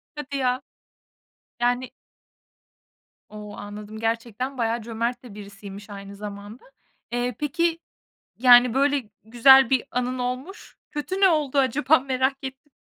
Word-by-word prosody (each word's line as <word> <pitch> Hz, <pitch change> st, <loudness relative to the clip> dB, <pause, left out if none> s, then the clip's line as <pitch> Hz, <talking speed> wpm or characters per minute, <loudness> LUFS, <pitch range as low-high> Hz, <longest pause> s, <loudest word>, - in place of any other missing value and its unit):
Hadi 285 Hz, -1 st, -5 dB
ya! 255 Hz, -1 st, 0 dB, 1.0 s
Yani 245 Hz, +1 st, 0 dB, 1.4 s
O, 210 Hz, -1 st, -9 dB
anladım 210 Hz, +1 st, -8 dB
gerçekten 230 Hz, +3 st, -3 dB
bayağı 230 Hz, 0 st, 0 dB
cömert 235 Hz, +2 st, -3 dB
de 240 Hz, -5 st, -11 dB
birisiymiş 200 Hz, 0 st, -10 dB
aynı 200 Hz, 0 st, -9 dB
zamanda. 205 Hz, +3 st, -9 dB, 0.5 s
Eee, 245 Hz, -1 st, -1 dB
peki 335 Hz, +3 st, 0 dB, 0.6 s
yani 245 Hz, 0 st, +7 dB
böyle 275 Hz, -5 st, +1 dB
güzel 250 Hz, +3 st, +6 dB
bir 260 Hz, -2 st, +2 dB
anın 250 Hz, +1 st, -2 dB
olmuş, 255 Hz, +10 st, -5 dB
kötü 345 Hz, +6 st, -4 dB
ne 385 Hz, -, +7 dB
oldu 295 Hz, -4 st, +1 dB
acaba? 275 Hz, +3 st, +3 dB
Merak 265 Hz, 0 st, 0 dB
ettim. 265 Hz, +2 st, -9 dB
250 Hz, 120 wpm, -24 LUFS, 220-270 Hz, 1.4 s, yani